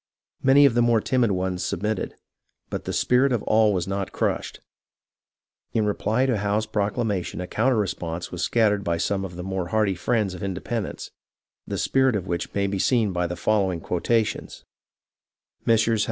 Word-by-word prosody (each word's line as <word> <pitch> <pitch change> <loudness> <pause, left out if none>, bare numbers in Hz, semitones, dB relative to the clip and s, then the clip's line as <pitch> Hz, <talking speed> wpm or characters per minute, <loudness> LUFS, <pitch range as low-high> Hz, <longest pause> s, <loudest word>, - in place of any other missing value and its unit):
Many 140 +2 +6
of 135 - +4
the 120 - +3
more 120 -1 +4
timid 125 +1 +1
ones 90 -1 -2
submitted, 105 +4 -2 0.6
but - - -4
the - - -2
spirit 130 +2 +3
of 120 -4 0
all 110 -1 +4
was 90 -3 -1
not 100 0 -3
crushed. - - -2 1.1
In 110 -2 +2
reply 110 +4 +1
to 125 -4 +1
Howe's 105 +2 0
proclamation 105 -3 -2
a 90 - -3
counter 120 +7 +1
response 85 -4 -3
was 90 - -5
scattered 105 +1 +2
by 85 -2 0
some 95 +3 -1
of 90 -2 -6
the 90 - -6
more 95 -1 -3
hardy 105 0 +1
friends 105 +1 0
of 90 - -8
indepen 100 +3 -3
dence, - - -8 0.6
the - - -3
spirit 130 -3 +2
of 95 -3 -2
which 85 -2 -3
may 100 0 +1
be 100 0 -2
seen 110 -3 +2
by 90 0 0
the 90 - -4
following 95 -1 +1
quotations: 110 +7 -1 0.3
— - - -70
" - - -46
Messrs. 115 0 +3
105 Hz, 180 wpm, -24 LUFS, 90-115 Hz, 1.1 s, Many